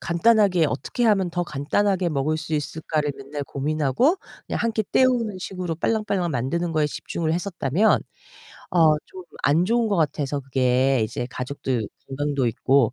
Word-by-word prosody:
간단하게 185 -1 +3
어떻게 145 - -2
하면 195 -5 +3
더 175 +1 -1
간단하게 175 +5 0
먹을 150 +1 0
수 160 0 -4
있을까를 150 0 -2
맨날 145 +2 -6
고민하고 150 - +1 0.3
그냥 - - -3
1 230 -1 +1
끼 220 - 0
때우는 235 -4 +2
식으로 180 -3 -4
빨랑빨랑 200 -2 0
만드는 160 +7 -1
거에 155 -2 +2
집중을 160 +2 -3
했었다면 180 +2 +1 0.7
아 180 - +2 0.3
좀 185 - -10 0.2
안 155 +5 +4
좋은 230 0 +2
것 200 - +1
같아서 145 -3 0
그게 130 0 +2
이제 110 +3 -4
가족들 125 -3 -3 0.2
건강도 140 -1 -1
있고 125 +1 +2
160 Hz, 340 characters per minute, -24 LUFS, 140-190 Hz, 0.7 s, 안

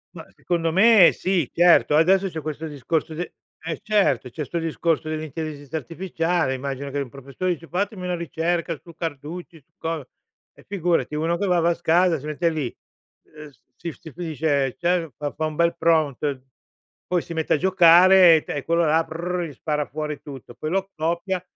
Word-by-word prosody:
Mah, - - -10
secondo 165 -2 -1
me, 205 -1 +7
sì, 180 -7 0
certo, 175 -3 +5
adesso 190 +5 +4
c'è 160 -3 -5
questo 155 +1 -5
discorso 150 +3 -2
d 175 +3 -5 0.3
eh, 160 0 -4
certo, 190 - +1
c'è 150 +5 -5
'sto 170 - -4
discorso 165 -1 -1
dell'intelligenza 155 -1 -5
artificiale, 165 0 -1
immagino 140 +1 -5
che 145 - -2
un 140 - -3
professore 140 +8 -3
dice: 165 0 -11
"Fatemi 195 +1 -2
una 180 -1 -1
ricerca 170 +1 -2
su 170 - -13
Carducci, 160 +1 -7
su - - -46
co"; 160 -4 -4 0.5
eh, - - -20
figurati 175 -5 0
uno 165 +3 0
che 200 - -1
va 180 -2 +3
va 170 - +3
a 170 - +3
casa, 170 0 +2
si 140 - -11
mette 155 +3 0
lì, 150 -7 -3 0.6
uhm, 150 -1 -10 0.3
si 170 - -5
f - - -22
si 160 - -11
fi 165 -1 -6
cioè 140 -3 0
cioè, 175 -3 0
fa 145 -1 -4
fa 155 - -3
un 155 -1 -4
bel 170 +1 +1
prompt, 150 -5 +1 0.7
poi 180 -2 +1
si 170 - -8
mette 160 -1 0
a - - +3
giocare, 180 0 +7
e - - -3
te - - -5
e 145 - -4
quello 170 +1 +2
là: 160 +1 +2
prrr, 175 +2 -3
gli 150 - -10
spara 150 +2 -2
fuori 150 0 -5
tutto. 135 -4 -11
Poi 155 - -4
lo 195 +1 -1
copia 170 +4 -2
165 Hz, 195 wpm, -23 LUFS, 150-175 Hz, 0.7 s, me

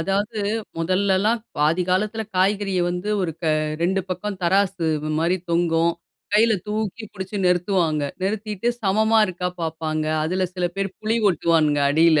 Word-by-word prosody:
அதாவது 205 +5 -1 0.4
முதல்லலாம் 190 +6 +1 0.2
பாதி 160 +5 +2
காலத்தில 210 +4 0
காய்கறிய 195 0 +1
வந்து 180 +3 -4
ஒரு 170 -3 -1
க - - -4 0.4
2 190 +3 +2
பக்கம் 190 +2 -3
தராசு 190 -1 +2 0.3
மாரி 170 +3 +2
தொங்கும். 170 0 +2 0.4
கையில 225 +2 +5
தூக்கி 215 +1 -3
புடிச்சு 190 +1 -6
நிறுத்துவாங்க. 175 -4 +1 0.2
நிறுத்திட்டு, 210 +2 -2
சமமா 220 +3 +3
இருக்கா 180 -1 -3
பாப்பாங்க. 155 -1 -2 0.2
அதில 185 +3 0
சில 180 -1 0
பேர் 195 0 -1
புலி 220 +1 0
ஒட்டுவானுங்க 160 -4 +2
அடியில. 160 +1 +5
185 Hz, 135 wpm, -22 LUFS, 170-205 Hz, 0.4 s, கையில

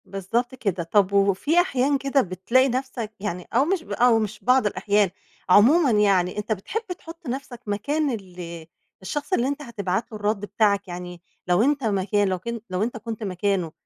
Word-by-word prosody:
بالضبط 230 +6 -2
كده، 200 -8 -2
طب 200 +3 +2
وفي 200 - +3
أحيان 280 -4 +1
كده 275 0 +2
بتلاقي 230 +7 +2
نَفسك 250 -3 -3
يعني 180 -3 -4
أو 255 +5 +4
مش 355 0 0
ب - - -13
أو 240 -2 +4
مش 215 -1 -3
بعض 255 -1 +4
الأحيان، 205 -1 +2 0.4
عمومًا 260 - +6
يعني 200 -4 +2
أنت 210 +1 -4
بتحب 220 - -2 0.2
تحط 330 -1 -11
نَفسك 255 -1 -5
مكان 285 +9 0
ال 175 -6 -7 0.4
الشخص 295 - -4
اللي 250 -7 +2
أنت 285 +1 -3
هتبعت 220 -5 -3
له 215 - -6
الرد 210 0 0
بتاعك، 200 -2 +1
يعني 175 -1 -7 0.3
لو 180 +2 +3
أنت 280 +1 +1
مكان 205 -1 +1
لو 185 -1 -1
كن 235 +4 -5
لو 185 +2 -1
أنت 235 +1 -3
كنت 225 0 -6
مكانه 190 -3 -1
215 Hz, 180 wpm, -24 LUFS, 195-260 Hz, 0.4 s, عمومًا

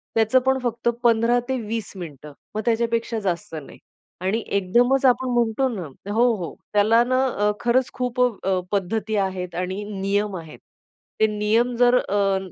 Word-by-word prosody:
त्याचं 225 +3 +4
पण 265 0 +3
फक्त 235 0 0
15 235 +1 +4
ते 260 - 0
20 225 -1 -4
मिनिटं. 150 -5 -9 0.2
मग 215 - -1
त्याच्यापेक्षा 230 0 0
जास्त 190 -2 -3
नाही 150 -3 -9 0.4
आणि 195 +5 0
एकदमच 240 +8 +2
आपण 260 0 +3
म्हणतो 240 +2 +1
ना, 210 -7 -4 0.3
हो, 230 +3 +3
हो. 170 -3 -5 0.2
त्याला 220 +3 +4
ना 255 +2 +1
अ, 210 -4 +1
खरंच 245 +1 +2
खूप 250 0 -3
अ, 195 -6 +1
पद्धती 210 +2 -1
आहेत 190 -2 -2
आणि 185 +3 -3
नियम 200 0 -1
आहेत. 160 -2 -10 0.6
ते 220 - +5
नियम 215 +3 +1
जर 245 +1 +4
अ, 200 -3 +1
220 Hz, 160 wpm, -23 LUFS, 195-240 Hz, 0.6 s, ते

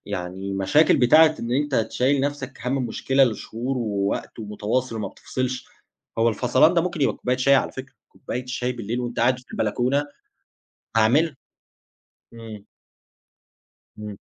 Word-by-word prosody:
يعني 95 +2 -5
مشاكل 95 +12 +3
بتاعة 155 +5 +6
إن 115 +1 -3
أنت 145 +2 0
تشيّل 125 +4 +1
نفْسك 140 -1 -3
هَم 130 0 0
مشكلة 135 +4 +2
لشهور 120 +2 -3
ووقت 100 -3 -2
ومتواصل 110 +3 -2
وما 105 -3 -3
بتفصلش، 130 +5 -4 0.5
هو 115 +1 +4
الفصلان 125 - +3
ده 170 - +4
ممكن 175 -1 -3
يبقى - - +2
بكوبّاية 125 0 -1
شاي 140 +1 +4
على 135 - +1
فكرة، 135 0 -9
كوبّاية 125 +1 -6
شاي 125 0 -2
بالليل 120 0 -4
وأنت 120 -1 -3
قاعد 125 +2 +3
في 125 - -17
البلكونة، 125 +6 0 0.9
هاعملها. 135 +8 +3 1.0
إمم. 110 -3 -10 1.3
إمم. 105 -1 -7
125 Hz, 140 wpm, -23 LUFS, 110-135 Hz, 1.3 s, بتاعة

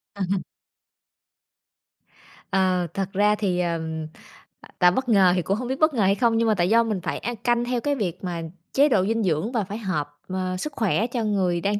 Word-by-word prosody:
Ờ, 200 - -3
ừm. 195 - +1 2.1
Ờ, 185 -2 +2
thật 195 0 -3
ra 210 +2 +3
thì, 190 -4 -1
ờ, 170 -2 0 1.0
tạo 180 -1 +6
bất 260 +4 -2
ngờ 190 -4 +5
thì 180 - +1
cũng 195 +5 -1
hông 245 +1 -4
biết 265 +1 -3
bất 310 0 +4
ngờ 230 - 0
hay 195 +1 +3
hông 230 -1 +3
nhưng 230 - +2
mà 220 - +4
tại 175 +1 +1
do 230 +1 +5
mình 210 -5 -2
phải - - -3
ăn 240 0 -4
canh 240 +2 +1
theo 245 -1 -1
cái 290 -1 0
việc 190 -7 -3
mà 175 -2 -3 0.3
chế 285 +2 +4
độ 190 -7 +3
dinh 225 0 0
dưỡng 175 +6 0
và 225 -5 0
phải 200 +3 -6
hợp, 185 -9 -2 0.2
ờ, 185 0 -2
sức 290 +10 -5
khỏe 220 +1 +1
cho 240 -2 -2
người 185 -5 0
đang 205 +2 0
200 Hz, 220 wpm, -24 LUFS, 185-230 Hz, 2.1 s, tạo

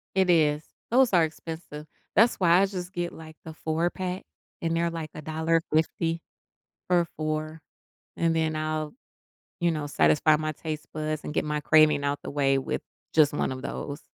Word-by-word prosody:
It 190 -1 +3
is. 150 -3 +3 0.3
Those 250 0 +4
are 175 -3 +5
expensive. 160 -1 -7 0.3
That's 225 +4 +5
why 175 -1 +5
I 195 - +4
just 185 -2 -6
get, 175 -2 -3
like, 160 0 -11
the 160 - -7
4-pack 175 +4 -2 0.4
and 165 0 0
they're 170 0 +1
like 165 -2 -5
$1.50 160 +1 0 0.7
for 175 -1 +4
4, 155 +1 -3 0.6
and 165 -1 +2
then 160 -1 +1
I'll, 155 -1 -2 0.7
you 170 0 +3
know, 155 -3 -2
satisfy 150 +1 +4
my 155 0 -2
taste 155 0 -5
buds 155 0 -3
and - - -4
get - - +1
my 150 0 -1
craving 155 -1 +5
out 140 0 0
the - - -7
way 135 -1 +2
with 135 - -3 0.3
just 155 -2 +5
one 145 - -1
of 130 0 -7
those. 145 +1 -5
160 Hz, 170 wpm, -27 LUFS, 155-170 Hz, 0.7 s, are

